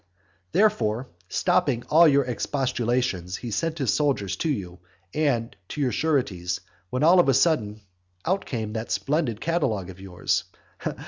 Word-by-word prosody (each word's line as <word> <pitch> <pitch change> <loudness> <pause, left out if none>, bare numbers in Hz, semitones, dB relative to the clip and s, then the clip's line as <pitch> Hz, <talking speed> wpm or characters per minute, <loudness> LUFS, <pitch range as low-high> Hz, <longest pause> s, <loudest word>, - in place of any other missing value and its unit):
Therefore, 125 - +2 0.2
stopping 120 -1 +1
all 165 +2 +7
your 140 -1 +4
expostulations, 120 -7 -1
he 120 - -6
sent 165 +9 -1
his 135 -8 +1
soldiers 130 -10 0
to 165 - -1
you, 90 -10 -3 0.3
and 125 -7 0
to 150 - -7
your 135 -4 +1
sureties, 100 - 0 0.3
when 130 +7 -1
all 175 +3 +7
on 170 - +4
a 135 - +4
sudden 110 -9 +2 0.4
out 190 +3 +1
came 110 -4 -4
that 110 0 -4
splendid 140 -7 0
catalogue 120 - -1
of 95 +1 -14
yours. 90 -2 -1
125 Hz, 145 wpm, -25 LUFS, 105-150 Hz, 0.4 s, all